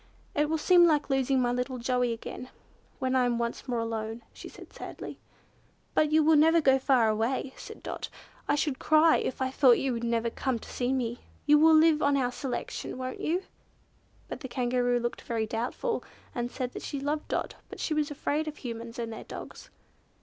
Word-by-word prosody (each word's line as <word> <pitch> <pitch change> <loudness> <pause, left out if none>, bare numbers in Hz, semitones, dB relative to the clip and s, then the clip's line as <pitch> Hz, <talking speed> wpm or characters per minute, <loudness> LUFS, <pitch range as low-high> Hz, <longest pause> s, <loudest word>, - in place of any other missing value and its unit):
"It 295 +1 +1
will 320 - +1
seem 350 +2 +6
like 300 -3 +1
losing 270 0 +2
my 245 -1 +2
little 250 +1 -2
Joey 250 0 0
again, 230 +2 -6 0.5
when 260 0 -1
I 255 - +4
am 240 -1 0
once 235 +3 -3
more 245 -2 -1
alone," 225 0 -3
she - - -10
said - - -14
sadly. - - -8 0.7
"But 305 -1 +3
you 310 0 +5
will 315 +1 +5
never 325 +3 +6
go 270 -3 +4
far 260 -4 +3
away," 230 +5 0
said - - -10
Dot. - - -5 0.4
"I - - +3
should 290 -2 -1
cry, 315 +1 +5
if 260 - -2
I 260 - -1
thought 260 -3 +5
you 270 -2 0
would 235 0 -4
never 235 0 0
come 260 0 -1
to - - -11
see 245 0 -2
me. 245 -2 -1 0.3
You 295 0 +6
will 320 +1 +7
live 315 -1 +5
on 285 0 +3
our 250 -2 +1
selection, 255 -1 -4
won't 255 0 -5
you?" 355 +4 0 0.8
But - - -6
the 265 - -6
Kangaroo 245 -1 +1
looked 240 0 -3
very 230 -2 -2
doubtful, 245 - -2 0.3
and 240 -1 -2
said 250 0 -4
that - - -7
she 285 - -4
loved 295 +2 -2
Dot, - - -2 0.2
but - - -9
she 315 - -1
was 300 -1 0
afraid 295 +1 -2
of 305 - -5
Humans 230 -2 -7
and 230 -1 -4
their - - -8
dogs. - - -9
260 Hz, 205 wpm, -29 LUFS, 240-295 Hz, 0.8 s, will